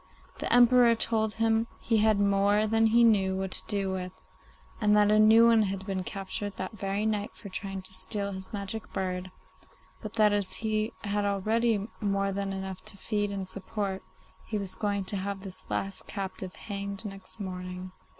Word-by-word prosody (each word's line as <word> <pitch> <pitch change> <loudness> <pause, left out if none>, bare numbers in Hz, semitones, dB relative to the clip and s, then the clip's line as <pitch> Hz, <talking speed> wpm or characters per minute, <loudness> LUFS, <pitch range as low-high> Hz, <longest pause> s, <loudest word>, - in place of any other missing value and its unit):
The - - -2
Emperor 245 -1 +6
told 220 -1 +1
him 225 0 +2
he 225 - +1
had 215 -1 +4
more 200 +1 +3
than 225 +1 +3
he 235 +2 +5
knew 195 -4 +4
what 190 -1 -3
to - - +1
do 200 -3 0
with, 185 -1 -3 0.7
and 210 -1 +4
that 210 0 +5
a 215 - +5
new 220 +2 +7
one 230 -1 +6
had 195 -2 -2
been 190 -2 -2
captured 195 +1 -4
that 185 - -4
very 200 0 -2
night 210 -1 -1
for 205 - -10
trying 195 0 -5
to 185 - -6
steal 200 +1 -3
his 190 -1 -6
magic 210 +2 -5
bird, 185 -1 -2 0.7
but 215 -1 -7
that 210 -2 +4
as 205 -2 -1
he 215 0 -1
had 205 0 0
already 210 +2 +1
more 195 -1 0
than 195 0 -2
enough 190 -1 -5
to 215 -2 -1
feed 205 +1 -1
and 195 -2 -4
support, 195 0 -3 0.5
he 215 - -2
was 195 -2 -3
going 200 -1 -1
to 200 - -4
have 195 0 -3
this 190 -2 -9
last 195 0 -3
captive 190 -2 -5
hanged 200 0 -5
next 195 +2 -8
morning. 185 -1 -6
200 Hz, 185 wpm, -29 LUFS, 190-215 Hz, 0.7 s, new